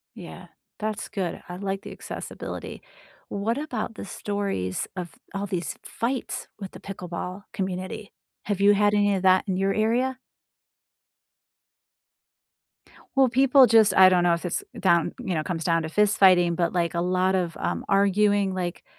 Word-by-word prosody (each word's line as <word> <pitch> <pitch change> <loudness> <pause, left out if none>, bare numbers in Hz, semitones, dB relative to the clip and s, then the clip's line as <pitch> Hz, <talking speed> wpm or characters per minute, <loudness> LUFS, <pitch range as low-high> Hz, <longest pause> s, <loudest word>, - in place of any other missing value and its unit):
Yeah, - - -10 0.3
that's 215 -1 -4
good. 195 -5 -4
I 180 - -6
like 195 0 -3
the - - -9
accessibility. - - -7 0.5
What 220 +5 -2
about 250 -7 -4
the - - -7
stories 200 - -3
of 175 -2 -5 0.2
all 200 +1 -2
these 180 -3 -3
fights 245 +2 -3
with 195 -3 -8
the - - -11
pickleball 180 0 -6
community? 190 0 -5 0.3
Have 200 -2 -2
you 205 +1 +6
had 205 +1 +3
any 205 -1 +3
of 190 - -2
that 185 0 +4
in 190 -2 -1
your 195 +1 +1
area? 245 +4 +1 3.0
Well, 265 -1 +5
people 265 +1 +6
just 220 -4 +5
I 190 0 +9
don't 180 -1 +3
know 175 -1 +4
if 170 - -6
it's 175 - -2 0.2
down, 170 -3 +2
you 190 -7 -3
know, 155 - 0
comes 165 -1 -4
down 165 -1 +2
to 160 - -4
fist 210 +5 +2
fighting, 175 -3 +5
but, 170 0 0
like, 170 -2 0
a 170 - 0
lot 185 +2 +1
of, 175 -3 -1
um, - - -2
arguing, 200 0 +2
like, 180 -1 -4
195 Hz, 165 wpm, -25 LUFS, 180-210 Hz, 3.0 s, I